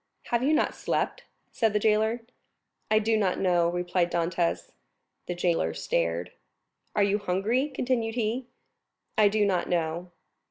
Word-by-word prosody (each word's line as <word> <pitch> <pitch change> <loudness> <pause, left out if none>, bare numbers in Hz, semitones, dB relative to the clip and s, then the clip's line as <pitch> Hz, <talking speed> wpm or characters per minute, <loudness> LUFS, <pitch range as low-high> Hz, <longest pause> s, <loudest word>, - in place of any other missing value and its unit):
"Have 235 0 +2
you 275 +4 +2
not 315 - +2
slept?" - - -2 0.3
said 225 -3 +1
the 210 - +2
jailer. 220 +2 +2 0.7
"I 215 - +4
do 220 +1 +2
not 195 -4 +1
know," 175 -2 +3
replied 175 0 0
Dantès. 170 0 -1 0.6
The 180 - -2
jailer 170 - 0
stared. 85 +1 -1 0.6
"Are 205 - +4
you 200 +1 +2
hungry?" 210 +9 0
continued 245 -4 -1
he. 240 +2 -1 0.7
"I 215 -1 +5
do 210 0 +2
not 185 -3 0
know." 170 +1 -1
200 Hz, 145 wpm, -27 LUFS, 175-225 Hz, 0.7 s, I